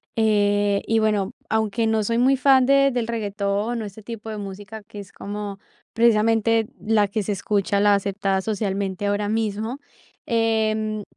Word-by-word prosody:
eh, 205 Hz, -2 st, +2 dB
y 225 Hz, 0 st, +2 dB
bueno, 210 Hz, -3 st, +1 dB, 0.2 s
aunque 220 Hz, +1 st, 0 dB
no 220 Hz, -1 st, +1 dB
soy 230 Hz, +1 st, 0 dB
muy 265 Hz, +2 st, +4 dB
fan 265 Hz, -2 st, +5 dB
de 275 Hz, 0 st, +4 dB
del 245 Hz, -2 st, -1 dB
reguetón 210 Hz, 0 st, -2 dB
o -, -, -4 dB
ese 205 Hz, +2 st, -10 dB
tipo 225 Hz, -1 st, -8 dB
de 215 Hz, -, -5 dB
música, 205 Hz, +2 st, -8 dB
que 210 Hz, 0 st, -11 dB
es 195 Hz, -1 st, -10 dB
como 205 Hz, -1 st, -6 dB, 0.3 s
precisamente 225 Hz, -1 st, +3 dB
la 215 Hz, -1 st, +2 dB
que 215 Hz, +1 st, -1 dB
se 205 Hz, +1 st, -2 dB
escucha, 200 Hz, 0 st, 0 dB
la 205 Hz, 0 st, +5 dB
aceptada 200 Hz, -1 st, -1 dB
socialmente 200 Hz, -1 st, -2 dB
ahora 205 Hz, 0 st, 0 dB
mismo. 220 Hz, +3 st, -2 dB, 0.5 s
Em, 220 Hz, -2 st, 0 dB
215 Hz, 160 wpm, -23 LUFS, 205-225 Hz, 0.5 s, fan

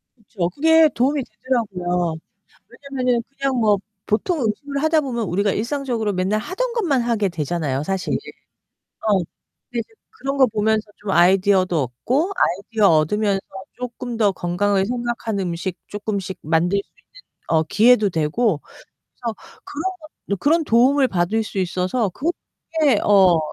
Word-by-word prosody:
그쵸. 200 Hz, -6 st, -3 dB
그게 320 Hz, -, +5 dB
도움이 270 Hz, +3 st, +1 dB
되더라고요. 185 Hz, -8 st, -2 dB, 0.5 s
왜냐면은 255 Hz, -4 st, -2 dB, 0.2 s
냥 275 Hz, -1 st, +1 dB
뭐 210 Hz, -2 st, +3 dB, 0.3 s
보통 305 Hz, -, 0 dB
음식을 280 Hz, +6 st, -2 dB
하다 315 Hz, 0 st, +3 dB
보면 245 Hz, -5 st, -3 dB
우리가 200 Hz, +4 st, +1 dB
일상적으로 235 Hz, -2 st, -1 dB
맨날 190 Hz, +3 st, 0 dB
하던 475 Hz, -, -3 dB
것만 340 Hz, -, +1 dB
하게 225 Hz, -4 st, +1 dB
되잖아요, 150 Hz, -4 st, -2 dB
사실. 190 Hz, +5 st, -2 dB, 1.0 s
어. 205 Hz, -2 st, +4 dB, 0.5 s
근데 235 Hz, -1 st, -2 dB, 0.3 s
그런 275 Hz, -11 st, -4 dB
거 265 Hz, -2 st, +6 dB
보면서 220 Hz, -1 st, +1 dB
좀 205 Hz, -, -6 dB
아이디어도 185 Hz, -2 st, +4 dB
얻고 255 Hz, -, -1 dB
아이디어 200 Hz, +4 st, +2 dB
얻으면서 195 Hz, +6 st, +2 dB, 0.3 s
쪼끔 245 Hz, -1 st, -6 dB
더 210 Hz, -3 st, +3 dB
건강을 190 Hz, +2 st, 0 dB
생각하는 235 Hz, -4 st, -2 dB
음식 175 Hz, +2 st, -4 dB
쪼끔씩 200 Hz, -2 st, -4 dB
만들 170 Hz, +5 st, +1 dB
수 200 Hz, -, -6 dB, 0.4 s
있는 160 Hz, -, -1 dB
어 160 Hz, -, +3 dB
기회도 215 Hz, +6 st, +4 dB
되고 165 Hz, +3 st, 0 dB, 0.4 s
그래서 235 Hz, -3 st, -7 dB, 0.3 s
그런 295 Hz, -, -6 dB, 0.4 s
거를 200 Hz, -, -1 dB
그런 320 Hz, -, +2 dB
도움을 260 Hz, +3 st, +4 dB
받을 190 Hz, +4 st, 0 dB
수 205 Hz, -2 st, -6 dB
있어서 185 Hz, +5 st, 0 dB
그렇게 310 Hz, -, -1 dB
어 190 Hz, -4 st, +5 dB
215 Hz, 310 characters per minute, -21 LUFS, 185-255 Hz, 1.0 s, 거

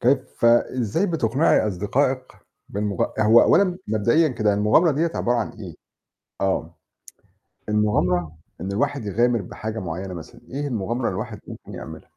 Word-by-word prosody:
كيف 130 Hz, -1 st, 0 dB
إزاي 120 Hz, -, +2 dB
بتقنعي 140 Hz, -, +2 dB
أصدقائك 130 Hz, +7 st, -1 dB, 0.4 s
بالمغ 100 Hz, -2 st, -1 dB, 0.2 s
هو 110 Hz, +2 st, +7 dB
أولًا 185 Hz, -2 st, +3 dB
مبدئيًا 115 Hz, +10 st, +3 dB
كده 110 Hz, -5 st, +1 dB
المغامرة 105 Hz, -, +4 dB
ديَّة 160 Hz, +4 st, 0 dB
عبارة 120 Hz, +1 st, +1 dB
عن 115 Hz, -, -1 dB
إيه؟ 95 Hz, -7 st, -9 dB, 0.7 s
آه. 95 Hz, -4 st, -1 dB, 0.9 s
المغامرة 90 Hz, -6 st, +1 dB, 0.2 s
إن 95 Hz, +2 st, -4 dB
الواحد 140 Hz, +4 st, -1 dB
يغامر 115 Hz, +2 st, +1 dB
بحاجة 110 Hz, +4 st, -6 dB
معيّنة 90 Hz, +1 st, -5 dB
مثلًا، 85 Hz, -2 st, -10 dB
إيه 145 Hz, +2 st, -3 dB
المغامرة 120 Hz, 0 st, -2 dB
اللي -, -, 0 dB
الواحد -, -, -5 dB
ممكن -, -, -10 dB
يعملها؟ -, -, -9 dB
110 Hz, 140 wpm, -23 LUFS, 100-130 Hz, 0.9 s, هو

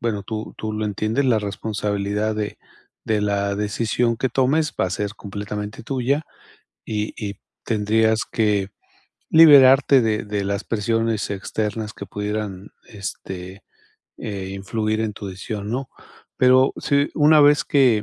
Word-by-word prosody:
bueno, 105 Hz, -4 st, -2 dB
tú 110 Hz, +1 st, -6 dB
tú 110 Hz, 0 st, -4 dB
lo 105 Hz, 0 st, -2 dB
entiendes, 110 Hz, +6 st, -1 dB
la 120 Hz, -4 st, +3 dB
responsabilidad 105 Hz, 0 st, -2 dB
de 105 Hz, -1 st, -4 dB, 0.4 s
de 110 Hz, -1 st, 0 dB
la 100 Hz, -1 st, 0 dB
decisión 115 Hz, +3 st, 0 dB
que 130 Hz, +2 st, 0 dB
tomes 135 Hz, +5 st, +1 dB
va -, -, +2 dB
a -, -, -5 dB
ser 105 Hz, +3 st, -3 dB
completamente 105 Hz, +1 st, -6 dB
tuya, 135 Hz, +5 st, -1 dB, 0.6 s
y 105 Hz, -1 st, -3 dB
y 100 Hz, -3 st, -5 dB, 0.3 s
tendrías 110 Hz, 0 st, +2 dB
que 105 Hz, -3 st, +1 dB, 0.6 s
liberarte 140 Hz, -4 st, +7 dB
de 110 Hz, -1 st, 0 dB
de 105 Hz, -1 st, -3 dB
las 100 Hz, +1 st, -2 dB
presiones 115 Hz, 0 st, -1 dB
externas 105 Hz, +2 st, -3 dB
que 100 Hz, -, -9 dB
pudieran, 105 Hz, -2 st, -4 dB, 0.2 s
este, 95 Hz, -1 st, -8 dB, 0.5 s
eh, 100 Hz, -2 st, -5 dB
influir 110 Hz, +2 st, -2 dB
en 110 Hz, -2 st, -1 dB
tu 100 Hz, -1 st, -8 dB
decisión, 100 Hz, +2 st, -6 dB
¿no?, 130 Hz, +2 st, -3 dB, 0.5 s
pero, 130 Hz, +1 st, +5 dB
sí 140 Hz, 0 st, +1 dB
una 150 Hz, 0 st, +5 dB
vez 145 Hz, 0 st, +5 dB
que, 125 Hz, -7 st, +3 dB
110 Hz, 140 wpm, -22 LUFS, 100-120 Hz, 0.6 s, liberarte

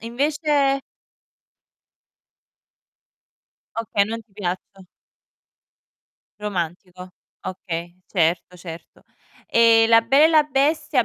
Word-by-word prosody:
invece 280 Hz, +2 st, 0 dB, 3.0 s
Okay, 215 Hz, -3 st, +1 dB
non 225 Hz, +2 st, -5 dB
ti 215 Hz, -2 st, -36 dB
piaccio 195 Hz, 0 st, -5 dB, 1.6 s
Romantico. 180 Hz, -2 st, -5 dB, 0.3 s
Okay, 175 Hz, -2 st, -6 dB
certo, 175 Hz, 0 st, 0 dB
certo. 170 Hz, -2 st, -11 dB, 0.5 s
Ehm, 230 Hz, -1 st, +5 dB
La 230 Hz, 0 st, +7 dB
Bella 275 Hz, +6 st, +5 dB
e -, -, +2 dB
la 310 Hz, -2 st, +5 dB
Bestia 290 Hz, -1 st, +1 dB
225 Hz, 80 wpm, -22 LUFS, 180-275 Hz, 3.0 s, La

